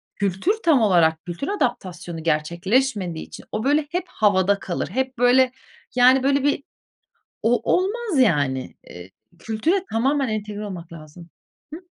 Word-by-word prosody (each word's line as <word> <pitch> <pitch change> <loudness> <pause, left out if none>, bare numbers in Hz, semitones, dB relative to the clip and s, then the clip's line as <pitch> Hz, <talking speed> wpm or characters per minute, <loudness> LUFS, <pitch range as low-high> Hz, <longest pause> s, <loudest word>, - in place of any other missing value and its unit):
kültür 200 - 0
tam 310 -7 +4
olarak 170 -5 +3
kültür 175 +10 -5
adaptasyonu 185 - -3
gerçekleşmediği 175 - 0
için - - -12
o, 215 - -3
böyle, 290 +2 +2
hep 355 +1 -1
havada 200 -1 +2
kalır. 175 - -3
Hep 260 0 -2
böyle, 250 +1 +4 0.4
yani, 255 +1 +5
böyle, 275 0 +2
bir 285 0 +1 0.8
o, 235 +2 +2
olmaz 400 - 0
yani. 140 - +1 0.2
Eee, 90 +1 -11 0.3
kültüre 310 - -1
tamamen 265 +4 +1
entegre 210 -1 -4
olmak 175 -4 -8
lazım. 165 +1 -12 0.4
Hıı. 335 - -8
215 Hz, 135 wpm, -22 LUFS, 175-270 Hz, 0.8 s, yani